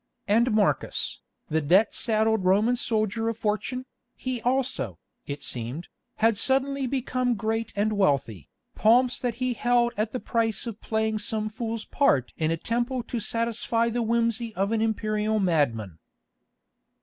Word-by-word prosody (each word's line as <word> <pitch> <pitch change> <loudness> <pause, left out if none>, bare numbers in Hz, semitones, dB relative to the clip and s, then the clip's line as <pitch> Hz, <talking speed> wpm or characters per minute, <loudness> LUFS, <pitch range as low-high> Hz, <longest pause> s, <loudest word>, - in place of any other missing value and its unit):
And 230 +4 +3
Marcus, 215 -1 +1 0.3
the 160 0 0
debt 185 +9 +4
saddled 220 -2 +2
Roman 205 +6 +3
soldier 225 -1 0
of 230 - -4
fortune, 225 +4 -2 0.3
he 255 -2 -4
also, 245 - -1 0.3
it 140 +1 -5
seemed, 125 +8 -3 0.3
had 225 -1 +2
suddenly 270 +2 +2
become 255 -1 0
great 225 +2 -2
and 210 +2 +1
wealthy, 140 - 0 0.2
pomps 245 +3 +3
that 245 -3 -2
he 255 +1 -1
held 240 +1 +2
at 215 +1 -1
the 255 - -3
price 225 -2 -1
of 225 -2 -7
playing 220 -1 -1
some 215 -1 -2
fool's 225 0 -4
part 135 - +1
in 155 -1 0
a 165 - 0
temple 240 +6 -2
to 240 - -4
satisfy 230 +1 0
the 240 +1 -1
whimsy 230 0 0
of 195 +2 0
an 225 -1 +1
Imperial 215 -1 0
madman. 120 - 0
220 Hz, 150 wpm, -26 LUFS, 205-235 Hz, 0.3 s, debt